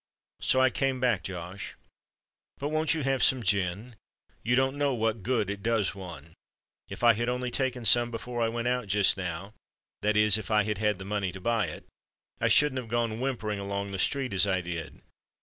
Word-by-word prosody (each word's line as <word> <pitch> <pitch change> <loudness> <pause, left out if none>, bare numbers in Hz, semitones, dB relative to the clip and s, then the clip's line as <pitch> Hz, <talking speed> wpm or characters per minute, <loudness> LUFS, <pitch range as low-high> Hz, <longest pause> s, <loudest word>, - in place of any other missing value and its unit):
So 130 - +2
I 130 -1 +4
came 135 -1 -1
back, 120 -7 +1
Josh. 90 +2 -7 0.8
But 145 - -3
won't 155 +1 +1
you 155 - -2
have 135 -1 0
some 130 -3 +4
gin? 100 +4 0 0.5
You 120 +3 +1
don't 135 +1 +2
know 145 -2 0
what 110 -1 -1
good 115 -1 0
it 100 0 -5
does 110 -2 0
one. 85 -5 -10 0.6
If - - -8
I 120 -1 +7
had 120 +3 -2
only 125 0 -2
taken 125 -3 -1
some 120 +1 +6
before 120 +1 -5
I 115 - +2
went 115 +1 -3
out 125 -3 -1
just 100 0 +4
now—that 100 +3 -5
is, 105 -1 +5
if 105 - -8
I 105 -1 +3
had 105 -1 -3
had 105 -2 +1
the 95 - -8
money 100 -2 -2
to 95 - -9
buy 115 +3 0
it—I - - -8
shouldn't 150 -3 +4
have 120 -3 -8
gone 115 -1 -1
whimpering 115 -6 -2
along 100 0 -4
the 95 - -4
street 135 +1 0
as 95 +1 +3
I 95 -2 +1
did. 85 -4 -7
110 Hz, 200 wpm, -28 LUFS, 100-125 Hz, 0.8 s, I